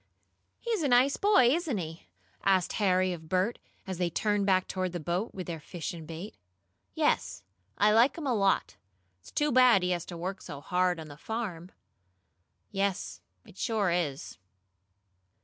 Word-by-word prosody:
"He's 455 -5 -1
a 295 - +1
nice 255 +2 +4
boy, 400 - +5
isn't 315 -8 -1
he?" 160 - -6 0.4
asked 190 -2 +2
Harry 185 -2 +3
of 160 -2 -10
Bert, 185 +6 0 0.3
as 190 -3 -5
they 175 -1 +1
turned 205 +3 0
back 185 -1 +3
toward 185 -1 -2
the 175 - -3
boat, 175 +8 -2
with 185 -2 -5
their 165 -1 -5
fish 165 +3 -6
and 160 -2 -9
bait. 165 +5 -7 0.6
"Yes, 90 - 0 0.3
I 210 +1 +4
like 240 +7 +4
him 320 - -5
a 260 - +1
lot. 195 -3 +1 0.4
It's - - -15
too 295 0 0
bad 245 -6 +6
he 180 - +1
has 175 -2 -1
to 175 - -8
work 185 +3 -4
so 140 - -8
hard 180 +2 0
on 160 - -8
the 145 -1 -11
farm." 185 -5 -5 1.0
"Yes, 195 -1 -2 0.2
it - - -16
sure 215 -6 +1
is." 155 -6 -2
185 Hz, 170 wpm, -29 LUFS, 170-225 Hz, 1.0 s, bad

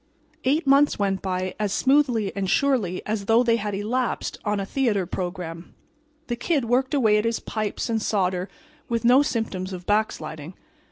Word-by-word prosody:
Eight 295 +6 +2
months 280 +1 +4
went 195 -2 0
by 185 -1 -2
as 210 -2 0
smoothly 260 -5 +2
and 195 -2 -2
surely 225 -7 +1
as 210 -2 -2
though 225 +3 +4
they 230 -1 +3
had 205 -2 -3
"elapsed" 235 +5 -2
on 210 -1 0
a 195 - -2
theater 215 -5 0
program. 175 -2 -6 0.5
The 240 - -2
Kid 275 +2 0
worked 260 +4 +1
away 220 -6 +4
at 210 - 0
his 230 0 0
pipes 215 -2 -3
and 225 -2 -1
solder 185 -3 0 0.4
with 235 -1 -1
no 250 +3 +7
symptoms 215 -8 -2
of 180 -1 -7
backsliding. 175 -6 -2
215 Hz, 170 wpm, -24 LUFS, 190-245 Hz, 0.5 s, no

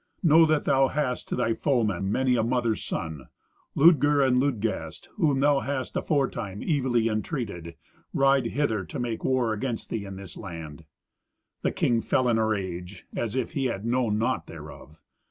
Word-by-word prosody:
Know 165 0 +6
that 155 -1 +1
thou 135 0 +4
hast 130 -3 -2
to - - -1
thy 120 -2 +1
foemen 105 - 0
many 130 +2 +2
a 115 - +2
mother's 115 -2 0
son. 80 -6 -5 0.5
Ludger 145 -3 +5
and 125 -1 +3
Ludgast, 105 - -2
whom 145 -8 +2
thou 145 -1 +4
hast 135 -2 -3
aforetime 115 - -1
evilly 130 -7 +1
entreated, 110 - -3 0.4
ride 135 -2 +3
hither 115 -7 0
to - - -7
make 120 -2 -3
war 130 -4 +1
against 115 +1 -4
thee 105 -3 -3
in 95 -1 -7
this 95 -1 -10
land." 80 -5 -8 0.8
The - - 0
king 115 -1 +1
fell 130 +2 +1
in 115 -1 +2
a 110 - +2
rage, 95 -3 -4
as 115 0 -2
if 130 -3 -1
he 135 - -1
had 110 -4 -2
known 120 -3 +1
naught 115 - -1
thereof. 75 - -11
120 Hz, 170 wpm, -26 LUFS, 100-135 Hz, 0.8 s, Know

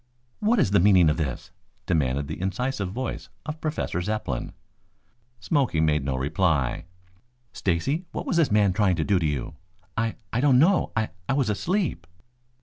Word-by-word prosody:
"What 220 +3 +2
is 100 - +2
the 100 - +5
meaning 90 -4 +5
of 75 - -2
this?" 75 -1 -4 0.3
demanded 70 -4 0
the 80 +4 -6
incisive 100 +1 -2
voice 125 +4 -5 0.2
of 155 0 -6
Professor 150 - -2
Zepplin. 90 - -3 0.9
Smoky 125 - +1
made 75 -2 +2
no 65 -1 -1
reply. 75 0 0 0.7
"Stacy, 135 - -1
what - - -5
was - - 0
this 165 -4 +4
man 105 -3 +4
trying 95 -2 +2
to 80 - 0
do 100 0 +2
to 80 - 0
you?" 75 +1 -3 0.4
"I 115 -1 -1 0.2
I 120 - +1
don't 135 -3 +5
know. 180 +8 +3
I 110 -1 0 0.2
I - - +3
was 135 -5 +1
asleep." 165 - -1
95 Hz, 165 wpm, -25 LUFS, 80-130 Hz, 0.9 s, the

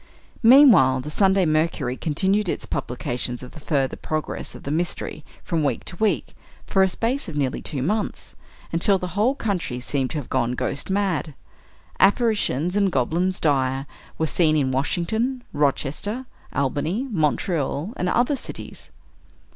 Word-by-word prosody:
Meanwhile, 225 - +7
the 150 - -6
"Sunday 190 +2 +3
Mercury" 155 -5 0
continued 190 +7 +1
its - - -3
publications 125 -2 -3
of 125 - -9
the - - -11
further 140 -3 0
progress 155 -1 -4
of - - -11
the 140 - -4
"mystery," 160 -1 -2 0.2
from 165 -3 -1
week 135 -5 0
to - - -5
week, 220 +1 0 0.3
for 195 - +2
a 190 - +6
space 230 +4 -2
of 150 - -6
nearly 135 -3 -1
two 135 -4 -3
months, 210 +7 -2 0.4
until 180 +4 +3
the 180 -1 -4
whole 220 +7 +2
country 180 - -2
seemed 130 +1 -1
to 140 - -4
have 145 - -5
gone 120 +1 0
ghost 140 +5 -3
mad. 190 -7 0 0.6
Apparitions 200 - +2
and 200 -2 +2
goblins 170 +8 0
dire 135 -3 +1 0.3
were 160 - +1
seen 155 -1 +3
in 135 -3 +1
Washington, 220 - -1
Rochester, 150 - -1 0.3
Albany, 150 - -1
Montreal, 160 - 0
and 180 - -1
other 245 +7 +2
cities. - - -7
165 Hz, 150 wpm, -23 LUFS, 140-200 Hz, 0.6 s, Meanwhile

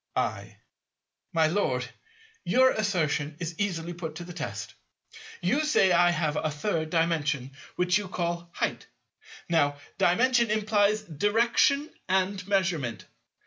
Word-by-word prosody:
I. - - -2 0.7
My 165 -3 +3
Lord, 130 -8 0 0.6
your 260 +1 +4
assertion 155 -8 -1
is 170 -1 -5
easily 175 -4 -2
put 165 -3 -6
to 175 - -6
the 175 0 -9
test. 175 - -5 0.7
You 300 - +2
say 250 -11 +3
I 175 0 +5
have 155 -3 0
a 155 - 0
Third 160 +1 -2
Dimension, 155 -5 0 0.2
which 180 +2 +2
you 205 - -6
call 170 -1 -3
"height." - - -2 0.6
Now, 145 -4 +2 0.2
Dimension 235 +5 +3
implies 215 0 +2
direction 230 - +2 0.2
and 190 0 0
measurement. 175 - 0
175 Hz, 125 wpm, -27 LUFS, 160-205 Hz, 0.7 s, I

